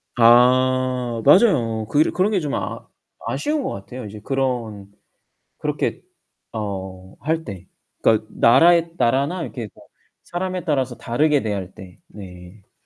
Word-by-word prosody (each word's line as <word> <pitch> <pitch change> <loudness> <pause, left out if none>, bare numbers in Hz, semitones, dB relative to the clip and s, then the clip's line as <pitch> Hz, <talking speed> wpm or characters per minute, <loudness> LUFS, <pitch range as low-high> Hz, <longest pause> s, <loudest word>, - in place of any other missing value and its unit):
아 125 0 +3
맞아요. 130 - +4
그 145 - 0
일 155 - +3
그런 185 +3 +1
게 200 - +1
좀 145 -4 -4
아 - - -4 0.4
아쉬운 300 -1 -1
것 - - -2
같아요, 100 +6 -8
인제 105 0 -9
그런 120 -7 -2 0.7
그렇게 - - -2 0.5
어 95 -3 -6
할 160 +3 -2
때. 95 - -9 0.3
그러니까 110 -1 +3
나라의 165 +7 +4
나라나 140 +9 +1
이렇게 120 -8 -6
뭐 - - -18 0.4
사람에 185 +1 -4
따라서 135 -6 -1
다르게 145 +4 +1
대할 100 -4 -4
때 95 -3 -13
네. 90 0 -13
125 Hz, 255 characters per minute, -21 LUFS, 105-150 Hz, 0.7 s, 맞아요